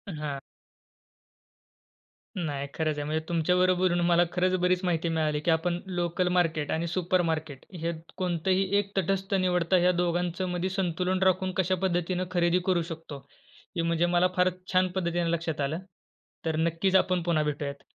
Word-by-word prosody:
हां. 150 -2 -4 2.0
नाही, 145 -6 -3
खरंच 155 -2 -1
आहे. 145 - -2
म्हणजे 155 +1 -1
तुमच्या 170 +1 +2
बरोबर 185 0 +3
बोलून 175 0 +1
मला 175 0 +5
खरंच 185 +1 +1
बरीच 180 +1 +1
माहिती 170 -1 0
मिळाली 155 -2 0
की 170 - +4
आपण 170 +2 +1
लोकल 175 0 -1
मार्केट 160 -4 +1
आणि 165 +2 -1
सुपर 180 +1 +1
मार्केट 155 -4 -4
हयात 165 -1 -5
कोणतंही 185 +1 +1
एक 200 -1 -1
तटस्थ 195 +2 0
निवडता. 180 -1 +2
ह्या 180 +1 +4
दोघांचमध्ये 180 +1 -1
संतुलन 185 0 0
राखून 185 0 +2
कशा 185 0 +2
पद्धतीनं 180 0 0
खरेदी 175 0 +2
करू 180 -3 +2
शकतो. 160 -3 -7 0.6
हे 170 - +2
म्हणजे 170 +1 +1
मला 175 +1 +5
फार 180 0 +4 0.2
छान 185 0 +4
पद्धतीने 170 -2 0
लक्षात 160 -3 -2
आलं. 150 +4 -1 0.7
तर 160 -1 0
नक्कीच 170 +4 +1
आपण 185 -2 +3
पुन्हा 165 -3 +1
भेटूयात. 140 -1 -4
175 Hz, 155 wpm, -28 LUFS, 160-185 Hz, 2.0 s, मला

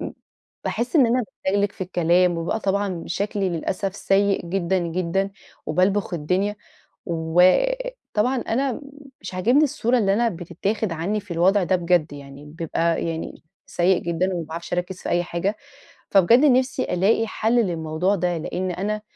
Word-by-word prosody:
ب - - -5 0.5
باحس 245 +7 -1
إن 265 -5 +6
أنا 250 +2 +2 0.2
باتلجلج 200 +1 +1
في - - -24
الكلام 175 0 +2
وببقى 170 +7 -2
طبعًا 195 -3 -1
شكلي 195 +2 -1
للأسف 190 +3 -3
سيء 195 -2 +1
جدًا، 185 +1 0
جدًا 180 +3 -1 0.4
وبالبخ 185 +4 +1
الدنيا، 185 +6 -1 0.5
وطبعًا 210 - +1
أنا 255 +3 -1 0.4
مش - - -7
عجبني 240 +11 +3
الصورة 250 -3 +1
اللي 195 -4 +2
أنا 235 +2 +2
بتتاخد 195 +3 -3
عنّي 180 +6 -1
في 200 -3 -12
الوضع 185 +4 +3
ده 185 - +2
بجد 170 -4 +1
يعني 140 0 -11
بيبقى 165 +2 -1
يعني 165 0 -5 0.2
سيء 180 +1 +2
جدًا 170 +3 -1
وما 170 -3 -3
باعرفش 170 +2 -6
أركز 180 +1 -3
في - - -4
أي 175 0 +2
حاجة. 180 +5 -2 0.5
فبجَد 195 +5 +5
نفسي 255 -1 +2
ألاقي 210 +5 +1
حل 220 +1 -1
للموضوع 165 +2 -1
ده 175 -2 -1
لإن 180 +3 -3
أنا 210 +4 -2
185 Hz, 150 wpm, -23 LUFS, 170-210 Hz, 0.5 s, إن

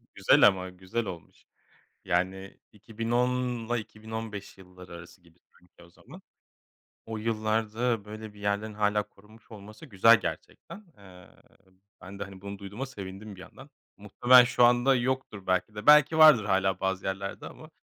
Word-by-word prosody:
Güzel - - +5
ama. 95 -2 -1
Güzel 95 +5 -5
olmuş. 85 -4 -11 0.6
Yani, 95 +2 -3
2010'la 120 +2 -2
2015 110 -2 -8
yılları 90 -1 -15
arası 85 +1 -13
gibi 85 -1 -25 0.2
çünkü 90 0 -23
o 85 - -18
zaman. - - -16 0.8
O 110 0 -6
yıllarda 110 +1 -2
böyle 110 0 -10
bir 105 - -17
yerlerin 100 +1 -3
hâlâ 105 0 0
korunmuş 105 +4 -22
olması 110 +3 -12
güzel 115 -1 +4
gerçekten. 210 - -8
Eee, 90 -3 -16 0.7
ben 100 +2 -11
de, - - -3
hani, 95 -1 -13
bunu 100 0 -8
duyduğuma 100 +6 -7
sevindim 100 -3 -10
bir 95 - -13
yandan. 135 +8 -14 0.3
Muhtemelen 120 +5 +5
şu 125 0 +1
anda 120 +3 +4
yoktur 125 -5 -3
belki 95 +3 -1
de, 105 - -8
belki 150 +1 +6
vardır 155 -9 +7
hâlâ 95 -2 0
bazı 95 0 -3
yerlerde 95 0 -5
ama. - - -14
105 Hz, 150 wpm, -27 LUFS, 95-115 Hz, 0.8 s, vardır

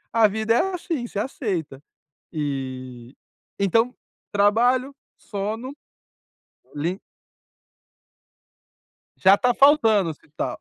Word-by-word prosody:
A 225 -2 +5
vida 220 +2 0
é 375 +10 +1
assim. 325 -8 -3
Você 205 - -6
aceit” 205 - -2 0.7
E, 130 -4 -5 0.4
então, 225 +5 +2 0.4
trabalho, 240 +6 +2 0.2
sono, 220 +6 -5 1.0
li 170 +6 -2 2.2
Já 195 +1 +6
tá 245 +2 +1
faltando 225 - +4
hospital. 155 0 -6
210 Hz, 85 wpm, -23 LUFS, 165-245 Hz, 2.2 s, Já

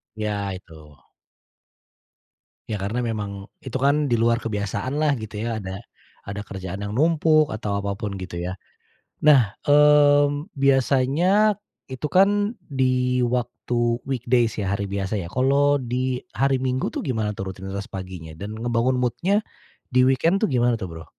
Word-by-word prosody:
Iya, 105 -2 -2
itu. 80 -5 -15 1.7
Iya, 105 - -1
karena 110 +5 -2
memang 105 -2 -3 0.3
itu 130 0 -4
kan 145 0 +2
di 120 - +3
luar 115 0 +2
kebiasaan 105 +4 -3
lah, 150 -2 +3
gitu 110 0 -8
ya, 115 -2 -2
ada 95 0 -6 0.5
ada 100 +1 -5
kerjaan 95 -1 -7
yang 100 0 -4
numpuk, 155 -2 +3
atau 105 -2 -2
apapun, 100 0 -3
gitu, 90 -2 -6
ya. 90 +2 -4 0.7
Nah, 145 -4 +8 0.3
mmm, 145 0 +5
biasanya 140 - +3 0.3
itu 130 +3 -4
kan 195 +1 +7 0.3
di 130 -2 0
waktu 120 0 -3 0.3
weekdays 120 -3 +1
ya, 95 - -1
hari 100 0 -2
biasa, 100 +1 -2
ya. 85 - -4
Kalau 140 +5 +2
di 125 +1 -2 0.2
hari 135 -1 +2
Minggu 130 0 0
tuh - - -3
gimana 110 -5 -2
tuh 95 -1 -5
rutinitas 95 +1 -7
paginya? 90 -4 -7
Dan, 105 +3 -6
ngebangun 120 +2 +1
mood-nya 180 - +1 0.5
di 130 - +5
weekend 165 +9 +3
tuh 215 - +4
gimana 120 -1 +2
tuh, 95 - -4
Bro? 80 0 -9
120 Hz, 145 wpm, -23 LUFS, 100-140 Hz, 1.7 s, Nah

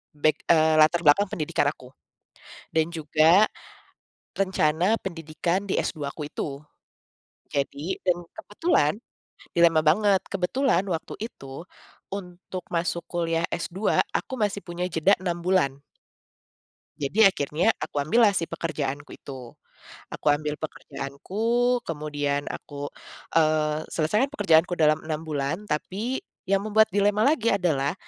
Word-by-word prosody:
back, 155 +1 +2
eee, 160 -1 +5
latar 155 +3 +5
belakang 155 +8 +5
pendidikan 150 -2 0
aku, 125 -4 -15 0.8
dan 160 0 +3
juga, 160 +4 +4 0.9
rencana 185 0 +2
pendidikan 170 +2 -2
di 195 - -1
S2 150 -4 -2
aku 150 -2 -6
itu, 140 -1 -5 0.9
jadi 145 +5 -2
dan 175 -1 +3 0.2
kebetulan, 205 - +1 0.6
dilema 165 -2 +5
banget 195 +4 +4
kebetulan 195 +2 +1
waktu 165 -3 -3 0.2
itu, 135 - -10 0.5
untuk 180 -1 -7
masuk 170 0 -1
kuliah 165 -1 0
S2 175 +4 0 0.2
aku - - -7
masih 200 -1 -1
punya 175 0 -3
jeda 165 +4 +3
6 175 -2 -2
bulan. 180 -8 +2 1.3
Jadi 140 +9 -3
akhirnya 150 0 -1
aku - - -6
ambillah 210 +8 +4
si 170 - +1
pekerjaanku 145 -3 -4
itu, 130 -4 -10 0.6
aku - - -9
ambil 150 0 -3
pekerjaanku 140 +1 -8 0.5
kemudian 145 -2 -2
aku, 145 -1 -7 0.5
eee, 155 -1 +2
selesaikan 210 - +1
pekerjaanku 170 - +3
dalam 155 0 +4
6 155 -1 -2
bulan 145 +1 -1
tapi, 210 - -3 0.3
yang 195 0 +2
membuat 220 +1 +4
dilema 205 +1 +2
lagi 280 -6 +2
adalah 155 -7 +1
165 Hz, 120 wpm, -25 LUFS, 150-190 Hz, 1.3 s, eee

